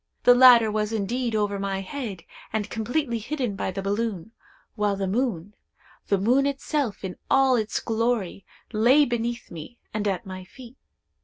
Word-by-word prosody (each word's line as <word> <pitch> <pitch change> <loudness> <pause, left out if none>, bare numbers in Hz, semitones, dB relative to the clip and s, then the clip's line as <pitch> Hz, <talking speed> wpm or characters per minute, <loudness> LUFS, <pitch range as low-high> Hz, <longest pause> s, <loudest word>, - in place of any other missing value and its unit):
The 245 - +8
latter 245 -3 +7
was 210 0 -1
indeed 225 +3 -1
over 205 -2 0
my 195 -1 -2
head, 205 -3 -6 0.3
and 215 -1 -3
completely 235 +2 -1
hidden 245 -2 -3
by 195 - -2
the 195 +1 -5
balloon, 205 -1 -2 0.4
while 210 -2 0
the 195 0 -2
moon—the 205 -2 -4
moon 250 +8 +3
itself 275 -5 -2
in 185 -1 -5
all 270 -1 +4
its 220 -2 -1
glory—lay 230 +3 +1
beneath 240 -1 -3
me, 170 +8 -9 0.2
and 210 -1 -1
at 190 -3 -2
my 185 -1 -7
feet. 245 +6 -14
220 Hz, 150 wpm, -25 LUFS, 200-245 Hz, 0.4 s, The